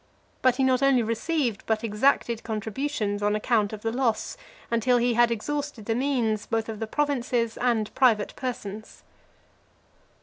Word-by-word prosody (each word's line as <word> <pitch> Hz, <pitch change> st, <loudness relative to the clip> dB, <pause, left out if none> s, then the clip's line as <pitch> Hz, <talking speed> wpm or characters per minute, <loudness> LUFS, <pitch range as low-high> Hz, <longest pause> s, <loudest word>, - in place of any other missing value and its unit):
But 255 Hz, -1 st, +4 dB
he 265 Hz, -, +1 dB
not 260 Hz, 0 st, +3 dB
only 275 Hz, -3 st, +4 dB
received, 230 Hz, +1 st, -1 dB
but 220 Hz, 0 st, 0 dB
exacted 230 Hz, +1 st, +1 dB
contributions 220 Hz, 0 st, -2 dB
on 205 Hz, 0 st, +1 dB
account 215 Hz, -1 st, +1 dB
of 215 Hz, -1 st, -8 dB
the 225 Hz, -, 0 dB
loss, 230 Hz, -3 st, -1 dB, 0.4 s
until 235 Hz, +2 st, +3 dB
he 240 Hz, 0 st, +2 dB
had 240 Hz, +1 st, +4 dB
exhausted 280 Hz, +1 st, -3 dB
the 225 Hz, -, 0 dB
means 235 Hz, -4 st, 0 dB
both 225 Hz, -1 st, -1 dB
of 220 Hz, -2 st, -5 dB
the 225 Hz, -, -3 dB
provinces 245 Hz, -4 st, 0 dB
and 235 Hz, -4 st, 0 dB
private 230 Hz, -6 st, +2 dB
persons. 220 Hz, -5 st, -6 dB
230 Hz, 155 wpm, -26 LUFS, 215-255 Hz, 0.4 s, But